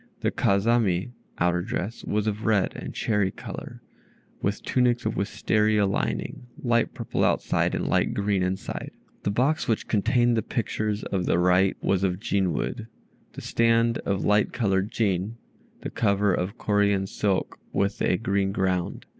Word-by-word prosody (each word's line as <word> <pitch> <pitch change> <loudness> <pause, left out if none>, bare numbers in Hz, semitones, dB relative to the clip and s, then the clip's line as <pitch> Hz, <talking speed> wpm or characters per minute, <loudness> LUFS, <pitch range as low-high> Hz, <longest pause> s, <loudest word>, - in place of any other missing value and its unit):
Their - - +1
Kazami 100 -1 +2 0.3
(outer 90 0 +2
dress) 110 +1 -4
was 105 0 -1
of 110 0 -2
red 105 -4 +2
and - - -6
cherry 105 -4 0
color, - - -8 0.6
with 100 +1 -1
tunics 125 -1 +1
of - - 0
Wistaria 105 +1 +1
lining 100 +4 -2
(light 120 -2 +1
purple - - -2
outside, - - +1
and - - -2
light - - +1
green 100 -1 +1
within). 90 +1 -3 0.3
The - - -1
box 130 +10 +1
which 115 - 0
contained 120 +3 +2
the 110 - +1
pictures 110 -3 -2
of 95 -3 -2
the - - +3
right 90 +2 +3
was 95 -1 +1
of 90 -1 0
"Jin" 100 -4 0
wood, 115 +7 -3 0.5
the - - -8
stand 115 0 +2
of 100 -1 -2
light 105 0 +3
colored 100 -5 +1
"Jin," 105 0 -1 0.4
the - - -5
cover 100 -2 +2
of 95 +7 -2
Corean 100 -2 +2
silk 95 0 -1
with 100 +1 -1
a 90 - +2
green 100 -2 0
ground. 95 -3 -1
100 Hz, 155 wpm, -26 LUFS, 95-115 Hz, 0.6 s, the